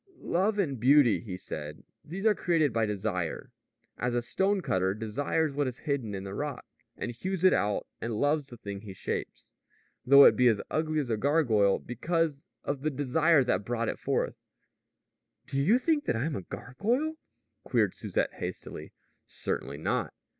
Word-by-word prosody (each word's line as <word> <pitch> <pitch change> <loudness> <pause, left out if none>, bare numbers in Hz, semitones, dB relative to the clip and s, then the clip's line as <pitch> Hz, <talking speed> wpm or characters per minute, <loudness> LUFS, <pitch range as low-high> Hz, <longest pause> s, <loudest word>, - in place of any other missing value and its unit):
"Love 195 +5 0
and 145 - 0
beauty," 130 -1 +5
he 95 -6 -6
said, 75 -4 -7 0.2
"these 190 +7 -6
are 220 - +6
created 165 - +1
by 115 -1 +1
desire. 95 -5 -3 0.5
As 125 0 -1
a 120 - 0
stone 195 +9 +1
cutter 95 - 0
desires 140 +8 -1
what 145 -1 0
is 125 -1 -4
hidden 130 -9 -1
in 95 - -5
the 95 0 -6
rock, 145 +3 -4 0.3
and - - -3
hews 185 +9 -4
it 185 - +7
out 105 0 0 0.2
and 115 -1 -2
loves 145 0 +1
the 120 - -8
thing 100 -3 -7
he 105 -3 -9
shapes, - - -5 0.5
though 140 +2 +8
it - - +7
be 125 - +4
as 110 -4 +3
ugly 155 0 0
as 140 -6 -1
a 110 - +1
gargoyle, 115 -7 +3
because 155 +3 -2 0.2
of 140 -2 -3
the 155 - +1
desire 145 +2 +3
that 105 -6 0
brought 115 +1 -1
it - - -4
forth - - -1 0.6
" - - -55
"Do 135 - -1
you 200 - +5
think 295 +3 +1
that - - 0
I'm 140 +7 -1
a - - -3
gargoyle?" 235 - -2 0.5
queried - - +1
Susette - - -2
hastily. - - -7 0.3
"Certainly - - -4
not." - - -2
135 Hz, 175 wpm, -29 LUFS, 110-160 Hz, 0.6 s, though